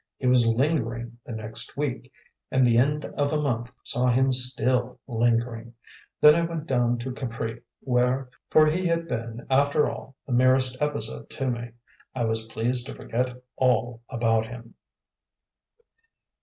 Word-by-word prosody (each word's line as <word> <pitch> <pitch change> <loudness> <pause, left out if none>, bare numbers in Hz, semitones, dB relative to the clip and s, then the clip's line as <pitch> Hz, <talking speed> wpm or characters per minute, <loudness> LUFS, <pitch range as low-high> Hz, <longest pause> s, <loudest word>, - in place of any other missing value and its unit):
He - - -6
was 125 -2 +5
lingering 120 -2 0
the - - -6
next 110 +2 -3
week, 130 -2 -3 0.4
and 130 -1 +3
the 120 -1 +4
end 150 +4 +1
of 145 0 -1
a 155 - +1
month 120 -5 -1
saw 125 +1 0
him 130 +2 +3
still 125 -1 +1
"lingering." 115 -1 0 0.4
Then 150 0 +8
I 170 - +2
went 165 -2 -3
down 120 -3 +1
to 125 +2 -5
Capri, 115 -2 -5 0.2
where 125 0 +1 0.2
for 155 - +6
he 175 +4 +1
had 170 0 0
been 115 -2 -5
after 140 +3 +3
all 135 - -7
the 130 - -4
merest 130 +1 +4
episode 115 -7 -2
to 135 -1 -2
me 120 0 -5 0.5
I 125 - -1
was 110 0 0
pleased 120 +3 0
to - - -7
forget 125 +1 -2 0.2
all 120 -2 +1
about 115 -1 +1
him. 115 0 -10
125 Hz, 155 wpm, -26 LUFS, 115-135 Hz, 0.5 s, Then